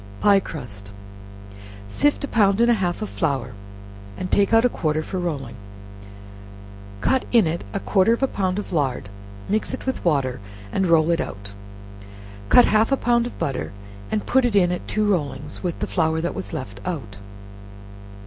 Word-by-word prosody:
Pie 200 -1 +5
Crust. 110 - -9 1.0
Sift 290 - +1
a - - -1
pound 200 -4 +3
and 235 0 +5
a 225 -4 +1
half 175 +3 -1
of 215 - -5
flour, 135 -7 -1 0.6
and 185 - -5
take 200 -1 +3
out 225 +1 +5
a - - +7
quarter 155 -8 -1
for 185 +3 -4
rolling; 145 -9 -3 1.5
cut 265 - +1
in 230 -5 +5
it 165 +2 -2
a 200 - -2
quarter 195 +2 +2
of 235 +3 +1
a - - +4
pound 190 -5 -1
of 205 - -5
lard, 135 -9 -1 0.4
mix 215 +2 -1
it - - -11
with 260 - -2
water, 135 -7 +1 0.3
and 190 - +1
roll 165 -1 +4
it 170 - +1
out; 100 0 -7 1.0
cut 245 - +7
half 220 +4 +3
a 275 - +3
pound 240 -1 +2
of - - -10
butter, 135 -7 -3 0.4
and 210 - -2
put 265 0 +3
it 240 -4 +1
in 180 -3 +4
at 180 - -4
two 215 0 0
rollings 145 -6 -2
with 175 -3 -3
the - - -2
flour 160 -2 0
that 170 +2 -2
was - - -6
left 100 -6 -6
out. 110 - -5
180 Hz, 180 wpm, -23 LUFS, 145-215 Hz, 1.5 s, a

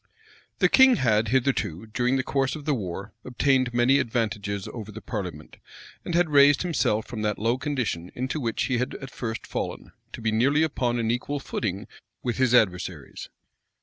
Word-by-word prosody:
} - - -27
The - - +4
king 265 -1 +6
had 110 - +2
hitherto, 115 - 0
during 125 +4 0
the 130 - 0
course 135 +1 0
of 150 -2 -9
the 150 - +1
war, 100 -3 -5
obtained 130 0 +1
many 120 +3 +4
advantages 105 -4 -2
over 110 -3 -7
the 110 - -8
parliament, 90 -10 -6 0.5
and 175 - -3
had 175 -2 +2
raised 145 +1 +6
himself 110 -11 0
from 115 -3 -6
that 105 -1 -1
low 115 +4 0
condition 120 - -2
into 130 +5 -2
which 115 -5 -1
he 125 -3 0
had 125 +2 -2
at 135 -1 -8
first 115 -2 -5
fallen, - - -5 0.2
to - - -7
be 110 -1 0
nearly 140 +8 +3
upon 125 -6 0
an 115 -1 0
equal 140 +4 -2
footing 105 -6 -3 0.4
with 120 -3 -2
his 130 -2 +3
adversaries. 90 - 0
120 Hz, 180 wpm, -25 LUFS, 105-135 Hz, 0.5 s, king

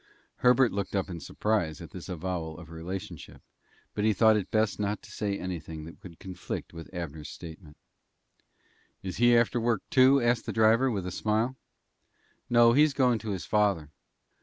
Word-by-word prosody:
Herbert 125 -1 +4
looked 100 0 -3
up 95 -1 -1
in 85 - -6
surprise 85 -1 -1
at 85 - -10
this 90 +1 -9
avowal 85 -2 -4
of 85 -2 -12
relationship, 85 +3 -7 0.5
but 105 - -2
he 110 0 +3
thought 110 +2 +5
it 105 -3 -2
best 110 -1 +1
not 105 0 -2
to - - -13
say 100 -2 -2
anything 80 -4 -6
that 85 - -12
would 85 -3 -12
conflict 95 -3 -7
with 85 -1 -10
Abner's 80 -5 -6
statement. 80 -2 -11 1.3
"Is 95 -1 -5
he 120 0 +5
after 120 +1 +2
work, 115 -3 0
too?" 130 +1 +6
asked 120 -1 +1
the - - -2
driver, 115 +4 +4
with 100 -6 -2
a 90 - -4
smile. 110 +7 0 0.9
"No; 120 -1 +6
he's 150 +1 +4
goin' 125 -4 +3
to 110 +1 -6
his 95 -3 -3
father." 100 -8 +1
100 Hz, 175 wpm, -28 LUFS, 85-115 Hz, 1.3 s, too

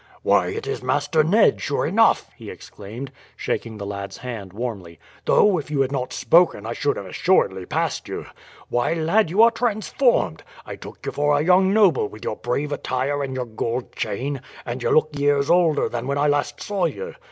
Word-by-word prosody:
"Why, - - +3
it 450 +2 -4
is 425 0 -3
Master 160 -3 +1
Ned, 205 +8 +3
sure - - -1
enough!" - - +3
he - - -10
exclaimed, 115 +7 -9 0.2
shaking 110 -2 -3
the 100 - -6
lad's 100 -1 -6
hand 115 -6 -7
warmly. 100 -7 -6 0.3
"Though 200 -5 +4
if 150 - -8
you 145 -2 0
had 135 0 0
not 130 -2 -3
spoken 165 - +3
I 115 - -3
should 145 +4 -1
have 100 - -6
assuredly 95 - +1
passed - - -2
you. - - -5 0.4
Why, 120 +7 0
lad, 165 +4 +2
you 200 +7 +5
are 235 - +6
transformed. 225 - 0 0.2
I - - -7
took - - -12
you - - -2
for 145 0 +2
a 145 - +1
young 185 +2 +4
noble 195 - +4
with 105 +2 -12
your 110 - -3
brave 140 +5 -2
attire 140 +1 -2
and 130 -1 -4
your 125 -1 -2
gold 115 +2 -4
chain; 125 +5 -3 0.2
and 120 +1 -5
you - - 0
look 155 0 +3
years 145 +1 +1
older 170 -4 +3
than 120 +1 -4
when 140 +1 -1
I 145 - +2
last 145 0 0
saw 200 -3 -1
you. 475 0 -4
140 Hz, 200 wpm, -22 LUFS, 120-175 Hz, 0.4 s, are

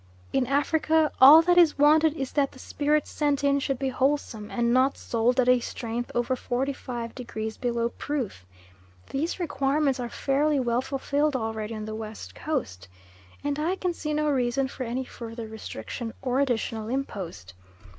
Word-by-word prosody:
In 265 -2 +2
Africa 310 +3 +2
all 300 +5 +10
that 355 +1 +5
is 330 -4 +5
wanted 305 +2 +5
is 270 -4 -4
that 280 -2 +1
the - - -14
spirit 295 +2 0
sent 290 -2 -1
in 280 0 +3
should 270 -1 -1
be 270 +1 -1
wholesome, 255 -5 -1
and 235 -1 +1
not 260 +2 +3
sold 240 +2 0
at 250 - +3
a 250 0 +5
strength 235 0 -4
over 240 +2 +1
45 245 -2 -3
degrees 220 -3 -5
below 235 -1 -1
proof. 250 - -4 0.7
These 315 +7 -2
requirements 280 -4 0
are 240 -1 -3
fairly 285 +3 +1
well 240 -1 +1
fulfilled 280 +2 -1
already 220 -2 -3
on 215 0 -5
the 215 - -5
West 220 0 -7
Coast, 225 - -4 0.6
and 290 0 -1
I 335 +5 0
can 365 -2 -2
see 305 -2 -4
no 300 0 +1
reason 260 0 +1
for 260 -1 -6
any 245 +3 -2
further 230 -2 -8
restriction 220 - -7
or 255 0 +1
additional 225 -4 -1
impost. 190 - -5
260 Hz, 165 wpm, -26 LUFS, 235-290 Hz, 0.7 s, all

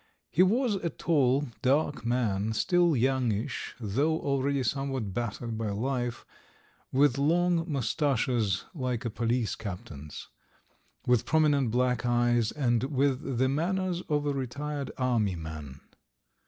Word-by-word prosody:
He 170 - +3
was 225 +5 +3
a 175 -3 -2
tall, 140 -4 +1
dark 145 +2 +1
man, 110 -3 0
still 175 - +3
youngish, 125 -4 0
though 140 +9 0
already 140 -1 0
somewhat 135 -5 -2
battered 115 0 -3
by 110 -2 -1
life; 120 +3 -2 0.7
with 140 -1 +3
long 170 +2 +2
moustaches 125 - 0
like 130 -5 -3
a 115 - -1
police 115 +1 0
captain's; 85 -8 -8 0.8
with 125 -2 +2
prominent 150 -5 +3
black 125 +1 +1
eyes, 120 -2 +2
and 120 -4 +1
with 135 -2 0
the 130 +2 +3
manners 175 +5 0
of 145 -1 +1
a 145 - +1
retired 140 +2 -4
army 115 -7 +1
man. 80 -4 -8
130 Hz, 125 wpm, -29 LUFS, 115-145 Hz, 0.8 s, He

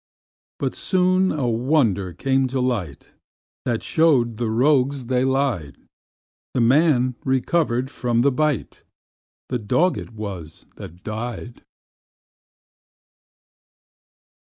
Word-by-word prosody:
But - - -2
soon 185 0 +2
a 140 -5 -1
wonder 115 - +1
came 135 +9 +1
to 130 +1 -2
light, 115 - -3 0.5
That 120 -3 -1
show'd 130 -9 +2
the 120 -1 -1
rogues 135 +2 +2
they 125 +1 +1
lied: 130 - -1 0.8
The - - +2
man 130 0 +3
recover'd 130 -1 0
of 120 -1 +2
the 140 - +4
bite 150 -2 -1 0.7
The 125 - -1
dog 160 - +1
it - - -10
was 95 -8 -7
that 90 +3 -11
died. 120 +2 -6
125 Hz, 105 wpm, -22 LUFS, 115-140 Hz, 0.8 s, the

